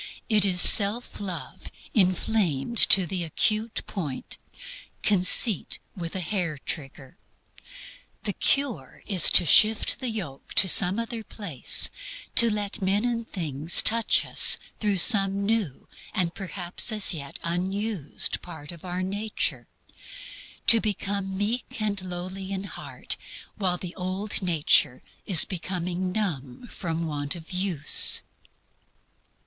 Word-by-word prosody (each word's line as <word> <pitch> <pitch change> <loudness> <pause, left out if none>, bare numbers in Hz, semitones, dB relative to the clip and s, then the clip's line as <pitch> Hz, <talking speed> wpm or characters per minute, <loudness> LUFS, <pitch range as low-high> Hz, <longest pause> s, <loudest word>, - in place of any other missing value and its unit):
It 210 -3 +6
is 180 -2 +3
self 210 +6 +5
love 175 -10 -6 0.2
inflamed 185 - -1
to 190 -2 +6
the 175 +1 -4
acute 215 +7 -1
point; 150 -10 -7 0.6
conceit, 200 +1 +2 0.2
with 170 -1 -7
a 190 - -2
hair 175 -4 -2
trigger. 135 +2 -10 1.0
The - - -3
cure 250 - -2
is 190 -5 +7
to 175 - +5
shift 215 +6 +3
the 255 -2 -3
yoke 175 -12 -8
to 190 - +5
some 185 +2 +3
other 230 -1 -5
place; 175 - -1 0.4
to 235 -1 +5
let 205 -2 -3
men 195 +4 0
and 230 -2 -4
things 160 -3 +2
touch 230 0 +2
us - - +4 0.2
through 205 -3 -1
some 195 0 +4
new 210 - -3 0.3
and 175 -4 0
perhaps 185 +2 -2
as 210 -3 +3
yet 140 -4 -7
unused 185 0 -1
part 160 -4 -11
of 170 -2 -15
our 180 0 -5
nature; 205 +3 -3 1.0
to 230 -1 +6
become 200 -2 -4
meek 225 +4 -4
and 205 -2 -3
lowly 185 +1 -8
in 190 0 -5
heart 200 - -4 0.4
while 185 -3 -2
the 175 0 -8
old 185 +3 -6
sensitiveness 150 -7 +1 0.2
is 185 -5 +5
becoming 180 0 -5
numb 180 - -5
from 165 -2 -5
want 145 0 -3
of 165 +1 -12
use. 180 -5 +3
190 Hz, 125 wpm, -24 LUFS, 170-210 Hz, 1.0 s, is